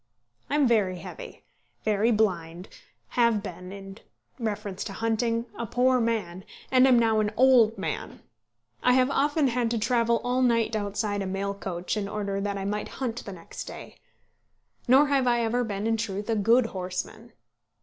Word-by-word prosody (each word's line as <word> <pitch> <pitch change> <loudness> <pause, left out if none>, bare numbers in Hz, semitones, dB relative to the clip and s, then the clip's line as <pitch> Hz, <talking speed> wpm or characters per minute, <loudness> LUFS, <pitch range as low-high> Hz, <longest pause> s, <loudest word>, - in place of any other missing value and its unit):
I 285 - 0
am 290 -3 +4
very 205 -6 +2
heavy, - - -10 0.4
very 215 +1 +2
blind, 180 -6 -1 0.4
have 235 -4 +2
been 180 -1 -8
in 195 +1 -10 0.4
reference 205 -4 -3
to 200 - -6
hunting 230 +2 0
a 235 - -4
poor 255 +3 +2
man, 200 -6 -2 0.3
and 260 0 +6
am 255 -2 +6
now 225 -2 +3
an 210 -1 0
old 240 -3 +5
man. 195 - -4 0.6
I 250 - +4
have 255 +1 +3
often 290 0 +2
had 240 -1 0
to 235 - -1
travel 235 0 +2
all 250 +1 0
night 230 -3 +2
outside 205 0 -2
a 195 - -3
mail 195 +1 -2
coach, 185 -2 -4
in 200 -2 -2
order 200 -1 -3
that 200 0 -2
I 195 - -4
might 210 +1 -2
hunt 245 -3 -3
the 200 - -7
next 170 - -9
day. - - -10 0.9
Nor 265 +4 +6
have 270 -3 +2
I 240 -1 +3
ever 235 +2 0
been 205 -2 -4
in 225 0 +1
truth 210 0 -3
a - - +2
good 225 +4 +4
horseman. 190 +5 -5
220 Hz, 175 wpm, -26 LUFS, 200-240 Hz, 0.9 s, and